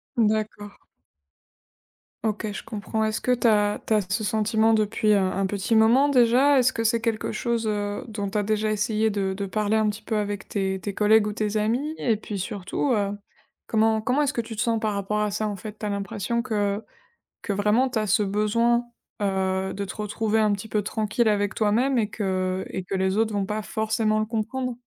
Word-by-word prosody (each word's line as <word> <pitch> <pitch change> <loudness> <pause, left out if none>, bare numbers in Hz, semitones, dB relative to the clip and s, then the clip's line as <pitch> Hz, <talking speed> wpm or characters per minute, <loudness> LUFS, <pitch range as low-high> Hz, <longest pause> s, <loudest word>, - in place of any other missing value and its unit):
D'accord. 215 -2 0 1.5
OK, 215 -1 -2
je - - -6
comprends, 220 +1 -3
est-ce 215 0 -2
que 250 - 0
tu 245 -1 +2
as 210 -2 +3
tu - - +1
as 215 - +4
ce 215 +2 -1
sentiment, 220 +2 +2
depuis, 215 0 +1
heu, - - +5
un 190 +1 0
petit 200 +3 -1
moment 235 +6 +5
déjà? 260 +2 +5
Est-ce 255 0 +3
que 230 - -2
c'est 230 +1 +2
quelque 225 -1 -2
chose, 230 0 -1
heu, 205 -1 -2
dont 205 -3 -4
tu 210 - -1
as - - 0
déjà 215 +1 0
essayé 215 +1 +1
de 195 -2 -1
de 200 +1 -4
parler 210 +2 0
un 215 -1 +2
petit 210 +1 -3
peu 220 0 -2
avec 205 -1 -3
tes 190 -1 -1
tes 200 +3 -4
collègues 210 0 +4
ou 210 - -3
tes 215 0 -1
amis? 240 +9 0
Et 225 -3 +1
puis 205 -1 -6
surtout, 205 +7 -2
heu, 200 -3 0 0.6
comment 220 0 +2
comment 255 +6 +1
est-ce 285 0 0
que 235 - 0
tu 225 0 -8
te 210 - -2
sens 230 -1 +1
par 215 -2 -1
rapport 200 +1 -1
à 210 - +1
ça, 215 +1 -2
en 205 - -3
fait? 210 +2 -9
Tu 210 - -6
as - - -1
l'impression 205 +3 -2
que 210 -3 -1 0.6
que 210 - -2
vraiment, 210 +6 +2
tu 245 -3 -1
as 215 - -2
ce 210 +2 +3
besoin, 230 +4 +1 0.4
heu, 190 -1 0
de 200 - -4
te 190 - -7
retrouver 215 +1 -1
un 215 -1 +3
petit 205 +2 -4
peu 210 -1 0
tranquille 215 +2 0
avec 205 -1 +1
toi-même 235 +5 +2
et 215 -2 0
que 185 -2 -1
et 190 - -4
que 190 +2 -3
les 190 +1 0
autres 220 0 +1
vont 200 -1 -1
pas 210 +2 -3
forcément 220 0 0
le 215 - 0
comprendre? 240 +3 -2
215 Hz, 215 wpm, -25 LUFS, 205-225 Hz, 1.5 s, heu